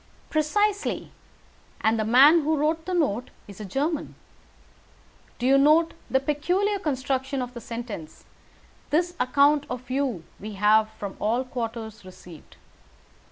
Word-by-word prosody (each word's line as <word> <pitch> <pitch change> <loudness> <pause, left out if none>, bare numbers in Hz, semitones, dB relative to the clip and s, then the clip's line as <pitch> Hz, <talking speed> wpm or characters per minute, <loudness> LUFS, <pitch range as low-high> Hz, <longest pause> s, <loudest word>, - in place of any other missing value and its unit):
"Precisely. 410 +7 0 0.7
And 220 +1 +2
the - - +1
man 270 +9 +7
who 310 +1 0
wrote 320 +3 0
the 370 - -1
note 250 - 0 0.2
is 200 -1 -12
a - - -5
German. 285 - -2 1.2
Do 245 - -3
you 270 +1 +5
note 310 +4 +4 0.2
the 265 - +3
peculiar 355 +9 0
construction 265 -3 -2
of 250 -1 -4
the 235 - -8
sentence 230 -9 -8 0.6
'This 345 +4 +1
account 280 +3 +3
of 250 0 -6
you 260 -10 -1 0.2
we 210 +1 -7
have 215 +2 +3
from 200 -2 -6
all 235 +4 0
quarters 230 -4 -6
received'? 180 -3 -14
265 Hz, 135 wpm, -25 LUFS, 220-305 Hz, 1.2 s, man